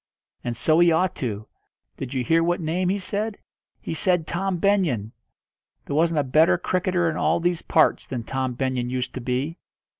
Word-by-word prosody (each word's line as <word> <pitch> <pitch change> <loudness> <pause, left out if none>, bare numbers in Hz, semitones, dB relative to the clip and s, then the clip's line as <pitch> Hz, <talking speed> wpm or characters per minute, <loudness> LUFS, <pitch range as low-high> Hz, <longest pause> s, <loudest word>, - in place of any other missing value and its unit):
"And 120 -2 -3
so 155 +6 +3
he 175 -1 +6
ought 180 +2 +2
to. 110 -4 -4 0.5
Did 135 0 -6
you 130 - 0
hear 165 +7 +3
what 175 +1 +1
name 175 +3 -1
he 195 - +1
said? 205 +2 -3 0.4
He - - -5
said 175 0 +1
Tom 185 +3 -2
Benyon! 165 - +1 0.7
There 140 - -3
wasn't 165 +1 +2
a - - -2
better 155 +6 +4
cricketer 180 0 0
in 165 - -1
all - - +2
these 175 0 0
parts 155 - +2
than 120 -3 -4
Tom 130 +1 -2
Benyon 130 -1 -1
used 125 0 -3
to 130 - -5
be. 130 +7 -2
160 Hz, 185 wpm, -24 LUFS, 130-175 Hz, 0.7 s, he